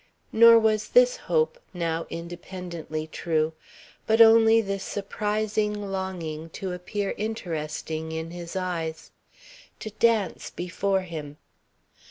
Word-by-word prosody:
Nor 230 +1 +8
was 215 -1 +2
this - - +5
hope 485 0 0 0.2
now 165 -1 -2
independently 170 -2 -6
true, 160 0 -1 0.5
but 220 +1 +3
only 225 0 +7
this 195 -3 -2
surprising 210 +1 -1 0.2
longing 170 -5 -4
to 190 -2 -4
appear 195 +3 -3
interesting 160 -6 -4
in 160 +1 -4
his 175 +1 -8
eyes. 165 -3 -3 0.7
To 215 - -5
dance 215 -4 +1
before 190 +2 -1
him. 155 -5 -7
185 Hz, 110 wpm, -26 LUFS, 165-215 Hz, 0.7 s, Nor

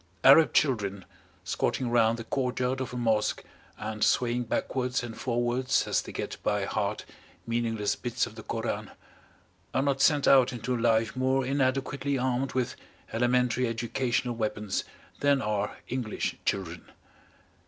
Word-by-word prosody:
Arab 155 +4 +8
children 100 -9 +1 0.4
squatting 130 - -1
round 115 -1 +3
the 115 - -6
courtyard 130 +1 -1
of 130 - -4
a 125 - -5
Mosque 110 -3 +1 0.3
and 105 0 -3
swaying 120 0 +2
backwards 125 +2 -1
and 115 -2 -6
forwards 120 +1 0
as - - +2
they - - -9
get - - -5
by - - 0
heart - - -2 0.4
meaningless 115 -3 0
bits 120 -2 -1
of - - -10
the - - -9
Koran, - - -3 0.9
are 130 - +3
not 140 -1 0
sent 145 -1 +4
out 130 -2 +6
into 125 +1 -2
life 115 -1 +2
more 130 +1 +1
inadequately 135 +1 0
armed 130 +1 -1
with 130 -2 -1 0.4
elementary 125 +1 +2
educational 120 +2 -1
weapons 105 -3 -2 0.4
than 140 -1 +3
are 105 -3 -2
English 125 -4 -2
children. 90 -3 -2
125 Hz, 140 wpm, -28 LUFS, 115-130 Hz, 0.9 s, Arab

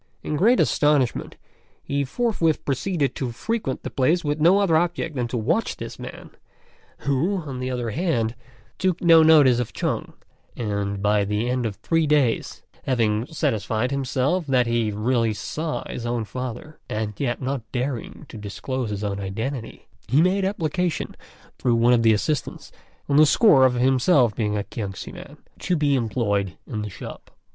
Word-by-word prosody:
In 150 - -2
great 225 +11 +4
astonishment, 145 -5 +2 0.5
he 140 0 -1
forthwith 165 - 0
proceeded 140 0 0
to 130 -3 -3
frequent 210 - -3
the - - -5
place 155 +7 +2
with 150 0 -1
no 175 +5 +6
other 195 -5 +3
object 165 -1 0
than 125 -2 -1
to 120 - -3
watch 165 - 0
this - - -8
man, - - -9 0.7
who, 145 +9 0
on 135 -4 -6
the 130 0 -3
other 120 -3 -2
hand, 120 - 0 0.5
took 185 -2 +1
no 165 -2 +7
notice 150 -6 +6
of 120 - -3
Chung; - - -2 0.4
and 100 -3 -2
by 105 0 +3
the 105 +3 -1
end 125 -1 0
of 105 - -5
three 165 +5 0
days, 145 -6 +1 0.2
having 115 -3 +1
satisfied 115 -4 -1
himself 140 +5 0
that 130 -2 +3
he 115 -2 0
really 115 +1 0
saw 155 +7 -4
his 120 - -6
own 120 -2 -1
father, 125 +5 -7
and 105 0 -2
yet 120 -4 -1
not 135 0 -2
daring 125 -1 -4
to - - -10
disclose 120 +4 -4
his 105 0 -4
own 100 -1 -2
identity, 110 +6 -5 0.2
he 135 - +3
made 185 +4 +3
application 180 -3 -1 0.4
through 120 -2 +2
one 120 +1 +4
of 120 - +4
the 115 -1 +5
assistants, 135 +7 -2 0.4
on 140 - +2
the 155 - +8
score 140 - +6
of 125 - -1
being 125 +1 +1
himself 130 -2 +4
a 105 -2 -1
Kiangsi 100 -1 -6
man, - - -11 0.2
to 180 - 0
be 145 -3 +2
employed 105 -6 0
in 110 -3 -4
the 105 - -4
shop. - - -10
130 Hz, 170 wpm, -23 LUFS, 115-155 Hz, 0.7 s, the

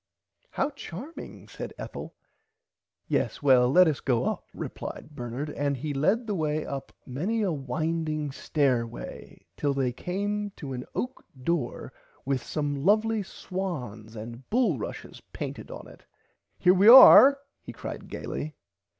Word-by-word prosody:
How 275 - -1
charming 280 - -9
said - - -8
Ethel. - - -8 0.9
Yes - - -1
well 125 -3 +5
let 180 +6 +6
us 150 -4 0
go 125 -4 0
up - - -3
replied 150 - -7
Bernard 130 +2 -5
and 140 -1 -1
he 145 +3 -4
led 190 - +1
the 215 - -2
way 155 -3 -1
up 140 -1 -6
many 190 - -1
a 190 - +1
winding 155 +1 -2
stairway 125 - -2
till 145 -2 -1
they 130 -2 +1
came 205 +9 -3
to 140 -4 -7
an 125 0 -5
oak 255 +1 -4 0.2
door 155 -6 -2 0.3
with 135 -1 0
some 145 -2 -3
lovly 215 +3 +3
swans 130 - -6
and 115 +3 -9
bull 220 - +2
rushes - - -7
painted - - -6
on - - -9
it. - - -16 0.5
Here 180 - +5
we 195 +3 +4
are 265 +3 +10 0.2
he - - -9
cried - - -7
gaily. 155 +1 -5
150 Hz, 140 wpm, -27 LUFS, 130-195 Hz, 0.9 s, are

